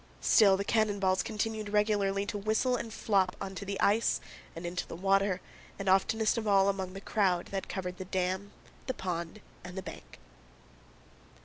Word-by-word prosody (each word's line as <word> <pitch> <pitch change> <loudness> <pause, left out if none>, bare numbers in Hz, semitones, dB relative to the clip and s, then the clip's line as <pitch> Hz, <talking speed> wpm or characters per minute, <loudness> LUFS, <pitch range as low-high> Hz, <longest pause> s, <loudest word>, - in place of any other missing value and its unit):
Still 200 -4 +5
the 200 - -2
cannon 215 -2 +2
balls 185 -1 +2
continued 215 -1 -3
regularly 205 -1 +1
to 210 - -4
whistle 220 +5 +1
and 230 -2 -4
flop 195 -4 +1
onto 195 +1 -5
the 200 0 -4
ice 215 +3 +3 0.4
and 165 +1 -6
into 175 +1 -3
the - - -7
water 195 0 +2 0.4
and 195 - -5
oftenest 215 +4 +3
of 220 - -4
all 195 -1 +5
among 190 -2 -3
the 195 - -7
crowd 185 -5 +1
that 195 -1 -4
covered 180 -1 -4
the 185 - -5
dam, 190 +2 -2 0.4
the 260 - -2
pond, 175 +2 -4 0.2
and 180 +1 -9
the 190 - -4
bank. - - -10
195 Hz, 175 wpm, -31 LUFS, 185-210 Hz, 0.4 s, Still